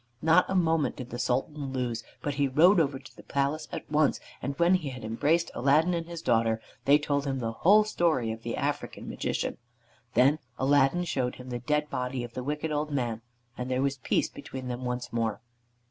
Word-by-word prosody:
Not 165 +3 +5
a 190 - -1
moment 165 -4 +2
did 125 -3 -8
the 120 - -5
Sultan 135 +3 -1
lose, 120 -3 -2 0.2
but 145 - -1
he 140 0 +1
rode 170 +8 +5
over 140 -4 +1
to 135 - -15
the - - -12
palace 140 +3 -1
at - - -6
once, 150 -1 +2 0.2
and 140 +2 -3
when 170 +2 +4
he 170 -6 +1
had 125 -3 -8
embraced 150 +10 +1
Aladdin 150 +7 +3
and 165 -1 -2
his 170 -1 -7
daughter, 115 -1 +2 0.3
they 140 +1 +7
told 145 -1 -1
him 135 -1 -1
the 115 -3 -2
whole 200 - +5
story 165 - +1
of 110 0 -6
the 115 0 -4
African - - -3
Magician. - - -2 0.6
Then 135 +6 +5 0.2
Aladdin 140 +5 +3
showed 130 -7 -1
him 125 0 -10
the 120 -1 -3
dead 150 +5 0
body 125 0 -2
of 120 -1 -8
the 130 - -4
wicked 150 +3 -2
old 150 0 -1
man, 120 -6 -2 0.3
and 125 0 -4
there 130 +1 +1
was 140 0 0
peace 130 - +1
between 130 -1 -7
them 125 +1 -4
once 125 -1 -3
more. 115 -1 -1
140 Hz, 205 wpm, -28 LUFS, 125-155 Hz, 0.6 s, they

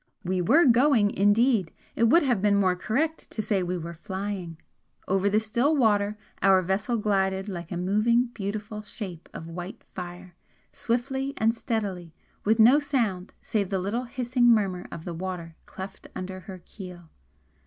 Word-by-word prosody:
We 185 0 0
were 290 - +5
'going' 240 -4 +4
indeed, 205 -2 +3 0.2
it 230 - +3
would 330 +9 +5
have 245 -8 +1
been 205 0 +3
more 190 -2 +3
correct 300 - -1
to - - -6
say 200 -3 +1
we 180 0 -2
were 170 0 -6
flying. 190 -2 -5 0.5
Over 195 +1 +2
the 210 +2 +3
still 235 +8 +1
water 210 -5 +2 0.2
our 190 -1 +5
vessel 195 +6 0
glided 195 -2 0
like 175 -4 -6
a 175 - -2
moving 215 +7 +2
beautiful 210 0 -4
shape 195 -5 -7
of 160 - -8
white 175 +3 -7
fire, 180 0 -9 0.4
swiftly 265 +3 -2
and 225 +1 +3
steadily, 195 -8 -3 0.3
with 220 +2 +3
no 240 +6 +7
sound 230 -11 -1
save 200 -4 -1
the 195 - 0
little 205 +7 -2
hissing 245 0 +1
murmur 200 -6 +2
of 165 - -8
the 175 - -4
water 170 -1 -5
cleft 190 +1 -9
under 185 0 -5
her 185 -2 -10
keel. 180 -5 -11
200 Hz, 165 wpm, -26 LUFS, 185-230 Hz, 0.5 s, no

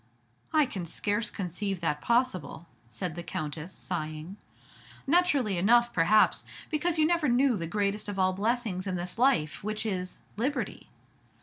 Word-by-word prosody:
"I 305 -2 +4
can 190 -9 -5
scarce 205 +6 -1
conceive 195 0 -3
that 150 -3 -1
possible," 235 - 0 0.2
said 155 +10 -4
the 175 - -6
Countess, 155 +1 -5
sighing. 155 +3 -5 0.7
"Naturally 275 - +3
enough, 240 +5 +4
perhaps, 180 +6 +4 0.3
because 325 +2 0
you 310 - +4
never 335 -3 +2
knew 250 +1 +4
the 165 -4 -3
greatest 205 +2 -1
of 205 - -4
all 185 0 +3
blessings 205 -2 -1
in 185 - -1
this 180 +4 -4
life, 175 - +2
which 215 +1 -3
is 185 -3 -3 0.2
liberty. 265 +6 -2
205 Hz, 145 wpm, -29 LUFS, 175-240 Hz, 0.7 s, I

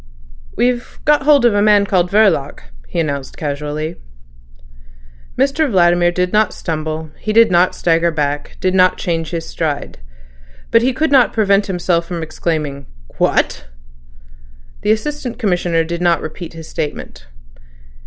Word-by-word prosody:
"We've 245 0 -1
got 300 -1 +4
hold 290 -4 +5
of 235 - +4
a 205 - +2
man 205 -1 +4
called 180 -3 +1
Verloc," 195 -9 +2 0.3
he - - -4
announced 140 -4 -3
casually. 150 +1 -4 1.4
Mr 280 +3 +1
Vladimir 175 -3 +3
did 180 +1 -1
not 215 0 +2
stumble, 155 -1 -4
did 225 0 +4
not 180 +1 +3
stagger 165 0 +2
back, 145 -2 -3
did 185 0 0
not 185 -1 +4
change 165 -2 -2
his 165 -2 -5
stride. 150 - -4 0.7
But 230 - +5
he 255 +3 +2
could 310 +4 -1
not 265 -3 +4
prevent 200 -2 +2
himself 175 -2 -1
from 170 -2 -4
exclaiming: 155 -3 -3 0.3
"What?" - - 0 1.1
The - - -2
Assistant 250 +2 -3
Commissioner 175 -7 0
did 170 +1 -5
not 175 -1 +3
repeat 160 +2 -7
his 160 -1 -10
statement. 150 - -6
175 Hz, 140 wpm, -17 LUFS, 160-215 Hz, 1.4 s, hold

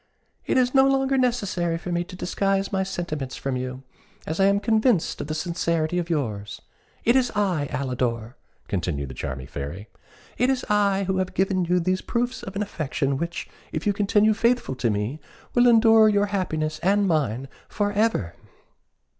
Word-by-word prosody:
"It - - +2
is 250 -1 +3
no 270 0 +6
longer 270 0 +2
necessary 200 -10 0
for 175 +2 -6
me 175 0 0
to 180 - -10
disguise 195 +2 -1
my 190 -1 0
sentiments 170 -8 -4
from 135 -1 -3
you, 130 +1 -5 0.4
as 160 +3 -4
I 195 - +5
am 200 +1 +4
convinced 220 -2 +1
of - - -5
the 155 - -3
sincerity 170 0 -1
of 170 -1 -4
yours. 110 -10 -2 0.5
It 235 - +4
is 255 -2 +3
I, 185 -8 +1
Alidor!" 125 -3 -2 0.3
continued 80 -8 -2
the - - -7
charming 65 +1 -5
Fairy 75 +12 -7 0.5
"It 250 +2 +3
is 265 -2 0
I 200 -2 +2
who 190 0 -1
have 185 -1 -2
given 190 -1 +1
you 180 +1 +2
these 185 +2 0
proofs 240 +1 -2
of 190 - -8
an 205 - 0
affection 140 -7 -2
which, 170 +2 -4 0.2
if 155 - -4
you 205 - +3
continue 210 +2 +3
faithful 235 - +1
to 120 - +1
me, 105 +8 -2 0.3
will 245 0 +5
ensure 225 -2 +6
your 205 -1 +3
happiness 155 -5 -1
and 200 +4 +2
mine 135 - 0 0.2
for 205 -1 -1
ever!" 205 - 0
180 Hz, 180 wpm, -24 LUFS, 140-210 Hz, 0.5 s, no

